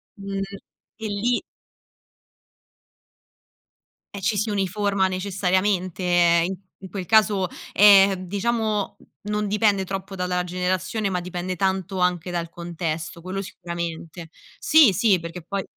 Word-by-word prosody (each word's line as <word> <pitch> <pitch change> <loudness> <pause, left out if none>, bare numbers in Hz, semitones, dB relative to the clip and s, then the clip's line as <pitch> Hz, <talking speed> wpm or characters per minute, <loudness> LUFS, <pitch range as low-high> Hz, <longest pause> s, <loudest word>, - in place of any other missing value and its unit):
mhmm, 195 -1 -5 0.6
e 220 - -2
lì 215 +4 0 2.7
eh 200 - -5
ci 205 +1 +1
si 215 +2 0
uniforma 200 0 0
necessariamente, 185 0 0
ehm, 175 -1 +4
in-in 190 0 -9
quel 190 -3 -4
caso, 205 -4 +3 0.2
è, 200 -1 +7
diciamo 210 +2 -1 0.3
non 210 0 -1
dipende 205 -1 +2
troppo 195 +1 -5
dalla 180 -1 -1
generazione, 185 +3 -1
ma 180 -1 -1
dipende 180 +1 -4
tanto 190 0 -1
anche 180 -1 0
dal 170 -1 -3
contesto, 170 -1 -5
quello 190 +3 -4
sicuramente. 170 -2 -6 0.3
Sì, 295 -9 +6
sì 190 -2 +3
perché 170 +1 -7
poi 195 +3 -3
190 Hz, 120 wpm, -23 LUFS, 180-200 Hz, 2.7 s, è